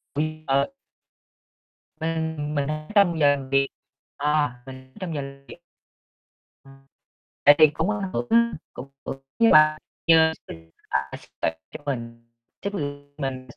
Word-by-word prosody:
Quy 155 +1 -2
ờ. 140 - +1 1.3
Mình 160 -2 -2
mình, 140 -1 0
ơ, 155 - -1
ở 155 - -14
trong 175 -5 +4
giờ 145 - +5
làm 135 -1 -8
việc 135 0 +3 0.5
ờ, 150 +1 +2 0.2
mình 130 0 -12
trong 180 -5 -4
giờ 145 - -2
làm 140 0 -10
việc. - - -11 1.1
Ừm, 135 0 -18 0.6
tại 145 - +9
vì 155 - +9
cũng 160 +6 -1
ảnh 200 -3 -2
hưởng 240 - -2
á, 235 +1 +4 0.2
cũng 130 +3 -9 0.2
hưởng 135 - -5 0.2
với 230 -1 +6
là 155 0 +6 0.3
chờ 160 -1 +6
xin 80 0 -11 0.2
à, 70 0 -1
sếp - - -19
tặng 80 - -1
cho - - -9
mình, 115 -4 -4 0.4
chứ 200 - -2 0.5
mình 130 -3 -4
145 Hz, 160 wpm, -24 LUFS, 135-160 Hz, 1.3 s, tại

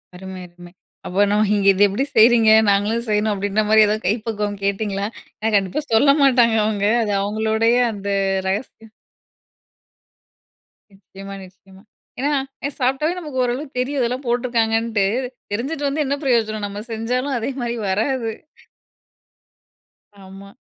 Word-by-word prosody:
அருமை, 190 0 -8
அருமை! 175 0 -15 0.3
"அப்ப 190 +3 +1
நம்ம 210 +1 +2
இங்க 200 -1 +1
இத 190 - -2
எப்படி 205 +7 -1
செய்றீங்க, 225 0 +6 0.2
நாங்களும் 210 +4 +1
செய்யணும்." 210 +1 +1
அப்படீன்ற 205 +2 -1
மாரி 220 0 +6
ஏதாவது 215 +1 -2
கைப்பக்குவம் 210 -1 -2
கேட்டிங்களா? 200 0 -1 0.3
ஆனா 225 +1 0
கண்டிப்பா 195 +8 0
சொல்ல 275 +5 +5
மாட்டாங்க 245 -4 +4
அவுங்க. 205 -2 0 0.2
அது 210 - -2
அவங்களுடைய 220 +3 +1 0.2
அந்த 200 -1 -8 0.4
ரகசியம். 220 +2 -5 2.0
நிச்சயமா, 195 0 -11
நிச்சயமா. 190 +1 -19 0.4
ஏன்னா 285 +3 0 0.3
எ - - 0
சாப்பிட்டாலே 270 +6 0
நமக்கு 295 -7 -3
ஓரளவுக்கு 255 +3 -4
தெரியும், 275 +3 -1
இதெல்லாம் 250 +3 -2
போட்டுருக்காங்கன்னுட்டு. 230 -3 0 0.5
தெரிஞ்சுட்டு 280 +6 -2
வந்து 300 +2 -1
என்ன 275 +1 0
பிரயோஜனம்? 220 -5 0
நம்ம 205 +1 -7
செஞ்சாலும் 250 +5 -2
அதே 230 - -3
மாரி 240 0 -2
வராது. 225 +3 -1 1.9
ஆமா. 195 +1 -13
220 Hz, 130 wpm, -20 LUFS, 200-245 Hz, 2.0 s, செய்றீங்க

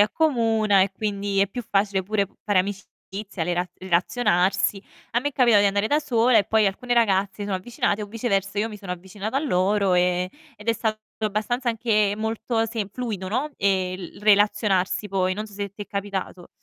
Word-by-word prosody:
accomuna, 225 -5 +3
e 195 - 0
quindi 200 -1 -1
è 200 - +3
più 245 +5 -5
facile 195 -1 +1
pure 200 +1 0 0.2
fare 205 -3 +3
amicizia, 195 0 -6
rela 175 +2 -1
relazionarsi. 190 +1 +1 0.3
A 240 - +1
me 290 - -1
è - - -9
capitato 240 -6 +5
di - - +4
andare 200 +1 0
da 295 +6 +2
sola, 250 -5 +3
e 205 - +3
poi 220 +1 +3
alcune 245 +6 -1
ragazze 200 -4 +2
si 205 - -6
sono 200 -2 -1
avvicinate 210 +1 -1
o - - -5
viceversa 200 -2 -1
io 215 +2 +1
mi 215 - -8
sono 195 -3 -5
avvicinata 190 +6 -5
a - - +2
loro, 200 -6 +2
ehm, 180 0 +2 0.3
ed 210 +2 -10
è - - +5
stato 220 -1 -2 0.2
abbastanza 220 +4 -1
anche 215 -3 +2
molto, 225 +1 -1
sem 220 -3 -3
fluido, 210 -5 -4
no, 260 +9 -1
ehm, 190 -2 +1 0.2
l - - -15
relazionarsi 205 -1 +3
poi. 185 -1 0
Non 210 +2 -4
so 210 - -15
se 200 0 -4
ti 205 - -7
è - - -11
capitato. 195 -2 -5
205 Hz, 195 wpm, -24 LUFS, 195-225 Hz, 0.3 s, capitato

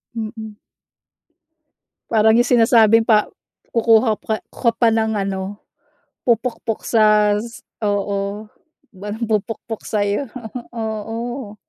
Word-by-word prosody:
Mm. 220 -1 -6 1.5
Parang 220 -1 +4
yung 235 - +5
sinasabing 225 -1 +5
pa 215 -2 +3 0.4
kukuha 225 -1 +3
pa 220 -1 -3
ku - - -12
ka 235 - +6
pa 230 0 +3
ng 220 0 +1
ano, 195 0 -3 0.7
pupukpok 230 -1 -1
sa 210 -2 +3
s 230 +2 -8 0.2
oo, 205 0 -2 0.4
batong 205 +3 -7 0.2
pupukpok 225 +1 -7
sa'yo, 205 +5 -1 0.5
oo. 225 +1 -5
220 Hz, 105 wpm, -20 LUFS, 210-230 Hz, 1.5 s, ka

